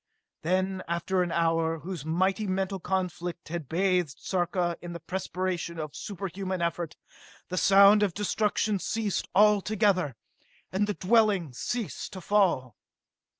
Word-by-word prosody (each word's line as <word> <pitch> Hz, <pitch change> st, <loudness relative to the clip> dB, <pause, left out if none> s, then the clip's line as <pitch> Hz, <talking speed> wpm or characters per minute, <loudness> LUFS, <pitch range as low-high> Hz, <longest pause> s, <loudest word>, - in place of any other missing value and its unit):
Then, 185 Hz, +2 st, 0 dB
after 170 Hz, +2 st, 0 dB
an 175 Hz, -1 st, -1 dB
hour, 165 Hz, -1 st, +1 dB
whose 175 Hz, -2 st, -6 dB
mighty 190 Hz, +6 st, 0 dB
mental 190 Hz, +1 st, -1 dB
conflict 180 Hz, -2 st, -3 dB
had 165 Hz, -4 st, -5 dB
bathed 180 Hz, -3 st, +1 dB
Sarka 175 Hz, -1 st, -1 dB
in 175 Hz, -1 st, -7 dB
the 170 Hz, -, -6 dB
perspiration 180 Hz, 0 st, -3 dB
of 155 Hz, -2 st, -5 dB
superhuman 190 Hz, -1 st, -4 dB
effort, 170 Hz, -1 st, -2 dB, 0.5 s
the 180 Hz, -, -3 dB
sound 200 Hz, +3 st, +7 dB
of 200 Hz, -5 st, +1 dB
destruction 210 Hz, 0 st, 0 dB
ceased 215 Hz, 0 st, -2 dB
all 210 Hz, 0 st, +6 dB
together, 190 Hz, -, +1 dB, 0.6 s
and 200 Hz, +2 st, +1 dB
the 210 Hz, -, -2 dB
dwellings 195 Hz, -, +2 dB
ceased 240 Hz, -5 st, -3 dB
to 190 Hz, -, -6 dB
fall. 170 Hz, -, +1 dB
185 Hz, 135 wpm, -28 LUFS, 170-195 Hz, 0.6 s, sound